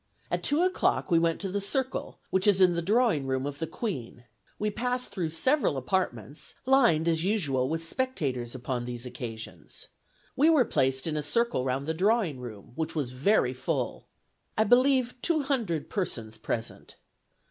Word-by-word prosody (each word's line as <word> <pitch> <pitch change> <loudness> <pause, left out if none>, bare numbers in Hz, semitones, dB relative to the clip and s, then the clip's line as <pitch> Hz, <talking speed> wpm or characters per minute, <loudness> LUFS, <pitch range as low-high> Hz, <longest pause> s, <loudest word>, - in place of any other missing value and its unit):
At - - 0
two 295 +4 +2
o'clock 370 - +1
we 165 - +6
went 165 0 +1
to 195 -2 -3
the 200 +1 -1
circle, 260 +6 -2
which 190 +2 +2
is 200 -2 +5
in 185 -2 +6
the 170 - 0
drawing 200 - +2
room 130 0 0
of 145 0 -5
the 160 - -2
Queen. 130 - -5 0.3
We 210 0 -1
passed 250 +3 -1
through 175 -5 -2
several 205 - +2
apartments, 135 - -2
lined 235 - +4
as 165 -1 +2
usual 145 -11 +1
with 165 +1 -2
spectators 140 - -2
upon 125 -1 -3
these 120 0 -6
occasions.... 120 -3 -7 0.5
We 290 +5 +5
were 300 -7 +5
placed 130 -5 +1
in 155 -2 -1
a - - 0
circle 230 - +1
round 135 +2 -1
the 160 - -1
drawing 190 - +1
room, 110 -5 -9
which 160 +4 -3
was 140 -6 -1
very 130 0 +2
full. 125 - -3 0.5
I 215 - +5
believe 250 +1 +3
two 315 -2 +1
hundred 230 - -1
persons 115 - -3
present. 115 0 -4
165 Hz, 170 wpm, -28 LUFS, -, 0.5 s, we